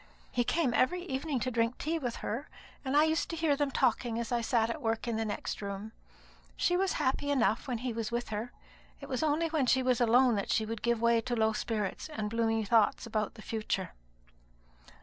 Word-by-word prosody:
He 245 - +1
came 270 -1 +1
every 350 +9 +2
evening 280 -3 -2
to 255 - -1
drink 230 +1 0
tea 325 +2 -1
with 245 -5 -3
her, 235 +8 -3 0.3
and 270 +1 +1
I 300 - +7
used 315 +1 +1
to 330 - -3
hear 320 -3 +2
them 290 0 0
talking 240 -3 +1
as 235 +1 -3
I 240 -1 +1
sat 230 -1 +1
at 235 - -6
work 225 0 -1
in 235 - 0
the 225 0 -1
next 210 - -4
room. 200 +2 -5 0.7
She 355 - +2
was 380 +1 +1
happy 275 +2 0
enough 250 -2 +2
when 250 -3 -1
he 245 +1 -3
was 225 0 -3
with 240 +1 -2
her. 220 +3 -4 0.5
It 280 - -9
was 260 -3 -2
only 315 +2 +1
when 305 -5 +1
she 260 +1 +3
was 250 -1 +2
alone 240 +2 +5
that 200 - -3
she 220 - +2
would 225 0 -5
give 235 -1 +1
way 235 0 +4
to 240 +2 -2
low 220 -1 +2
spirits 215 +5 -3
and 215 -8 -4
gloomy 225 -1 +1
thoughts 225 +3 +3
about 215 -2 -2
the 215 - -11
future." 215 -4 -2
240 Hz, 220 wpm, -31 LUFS, 225-275 Hz, 0.7 s, I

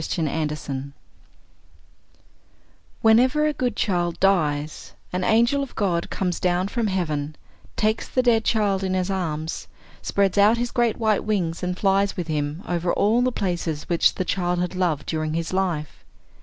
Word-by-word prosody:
THE 165 - -2
ANGEL 150 -3 -3 2.2
"Whenever 255 +7 +4
a 305 - +1
good 250 -3 -1
child 175 -4 0
dies, 155 -6 0 0.2
an 180 0 -1
angel 235 +7 +3
of 275 - -6
God 175 -5 0
comes 180 -2 -2
down 180 +1 +1
from 235 -1 -1
heaven, 155 -6 -2 0.4
takes 215 +1 0
the 255 - +1
dead 230 -2 +3
child 205 -4 +1
in 185 -1 0
his 185 +1 -1
arms, 160 -4 -3 0.3
spreads 200 0 +1
out 210 +3 +5
his 240 +1 -2
great 240 -3 +1
white 220 -3 +1
wings, 180 -6 -1
and 180 0 -2
flies 195 0 +1
with 170 -2 -4
him 150 +3 -2
over 175 0 0
all 220 +4 +2
the 255 +1 +2
places 175 -8 -3
which 170 -1 +3
the 185 - -2
child 180 -2 0
had 180 +1 -1
loved 175 -6 -1
during 155 -1 -2
his 165 +2 -3
life. 175 -6 -2
185 Hz, 160 wpm, -23 LUFS, 165-215 Hz, 2.2 s, out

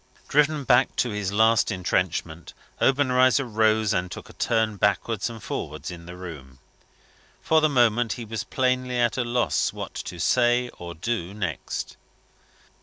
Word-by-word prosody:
Driven 150 0 +2
back 130 0 +3
to 120 - 0
his 105 -2 -2
last 110 +2 +3
entrenchment, 90 -3 -2 0.3
Obenreizer 130 -1 +3
rose, 110 -1 +2
and 90 0 -1
took - - -9
a - - -13
turn 110 -3 0
backwards 105 +2 0
and 115 -3 -10
forwards - - -5
in 85 -1 -10
the 90 0 -9
room. 75 -8 -9 0.8
For 160 0 +3
the 155 - +3
moment, 120 -3 +2
he 120 - -7
was 110 0 -4
plainly 125 -1 0
at 120 -1 +2
a 130 - 0
loss 120 -10 0
what - - -7 0.2
to 90 - -9
say 120 +4 +2
or 85 -1 -7
do 95 +1 -3
next. 95 -7 -4
110 Hz, 155 wpm, -25 LUFS, 95-125 Hz, 0.8 s, back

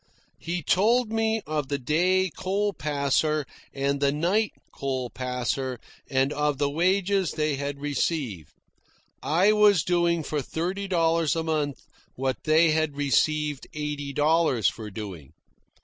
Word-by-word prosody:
He 175 0 -3
told 220 - +3
me 225 0 0
of 150 -2 -2
the 140 - -1
day 180 +7 +1
coal 200 +2 -1
passer 150 0 0 0.3
and 140 +1 -1
the 140 0 +2
night 180 +9 +1 0.2
coal 130 -3 -3
passer, 125 0 -3 0.3
and 135 +2 +1
of 150 -1 0
the 140 0 0
wages 190 +3 +1
they 150 -2 0
had 140 0 -4
received. 140 - -2 0.7
I 180 +7 +3
was 210 -5 +5
doing 170 -2 +1
for 150 0 -2
thirty 180 +8 -3
dollars 165 -4 +2
a 165 - -1
month 150 -3 -2 0.3
what 130 0 -3
they 160 +1 +5
had 155 -2 0
received 150 0 +1
eighty 150 -1 -4
dollars 150 -5 +2
for 110 -2 -3
doing. 95 -9 -8
150 Hz, 135 wpm, -26 LUFS, 140-175 Hz, 0.7 s, was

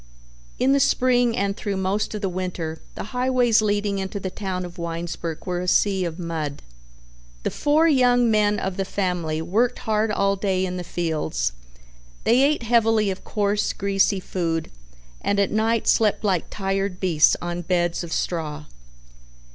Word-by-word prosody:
In 260 +2 +2
the 280 - +4
spring 245 -3 +3
and 200 -3 0
through 200 -2 -3
most 195 +3 -1
of 210 - -4
the - - +2
winter 180 -3 -4 0.2
the - - -5
highways 250 -3 +3
leading 205 -1 0
into 190 +1 -4
the 190 -1 -4
town 185 -3 -4
of 175 +1 -10
Winesburg 170 -1 -4
were 180 -1 -2
a 180 - -4
sea 190 0 +2
of 165 -1 -4
mud. 160 -5 -4 0.8
The - - -1
four 305 +3 +3
young 245 -5 +4
men 210 -1 +3
of 190 -1 -3
the 195 - 0
family 175 -5 -2
worked 230 +8 +1
hard 220 0 0
all 200 -1 +1
day 190 -1 0
in 180 0 -4
the 180 - -4
fields, 155 - -2 0.7
they 240 +3 +4
ate 285 -2 +2
heavily 225 -3 +3
of 185 - -7
coarse, 205 0 0
greasy 200 0 +1
food, 165 -3 -2 0.5
and 200 - 0
at 200 - +2
night 225 +1 +1
slept 215 -1 +3
like 190 -5 +1
tired 195 -1 -2
beasts 165 -5 +4
on 175 0 -4
beds 175 -1 0
of 170 - -8
straw. 155 -3 -3
195 Hz, 165 wpm, -23 LUFS, 175-215 Hz, 0.8 s, the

